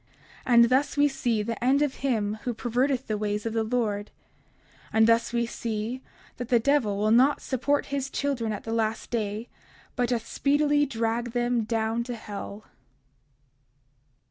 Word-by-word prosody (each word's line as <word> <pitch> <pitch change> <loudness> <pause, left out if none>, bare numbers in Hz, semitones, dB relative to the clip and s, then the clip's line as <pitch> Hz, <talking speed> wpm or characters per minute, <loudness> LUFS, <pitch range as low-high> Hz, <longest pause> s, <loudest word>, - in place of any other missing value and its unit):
30:60 250 - +2
And 235 0 +8
thus 270 +3 +1
we 290 0 +5
see 240 -6 -1
the 230 +2 -4
end 275 +3 +4
of 290 -3 0
him 220 -5 -1
who 245 -2 -3
perverteth 255 +3 0
the 215 -2 -2
ways 210 0 -2
of 225 - -2
the 225 -1 +1
Lord; 215 -3 -1 0.8
and 220 0 +5
thus 230 +1 +3
we 235 0 +1
see 230 +2 -4 0.4
that 245 -1 -5
the 245 - +5
devil 235 -5 +2
will 215 +1 +1
not 260 +5 +5
support 285 +2 0
his 275 -1 -1
children 270 -7 -1
at 210 - -5
the 225 - -4
last 225 -1 -1
day, 220 0 -2 0.5
but 245 -2 0
doth 235 -2 -1
speedily 290 +1 +2
drag 230 -1 -2
them 240 -2 +1
down 225 +1 0
to 245 -1 -4
hell. 210 -1 -7
235 Hz, 170 wpm, -26 LUFS, 220-260 Hz, 0.8 s, And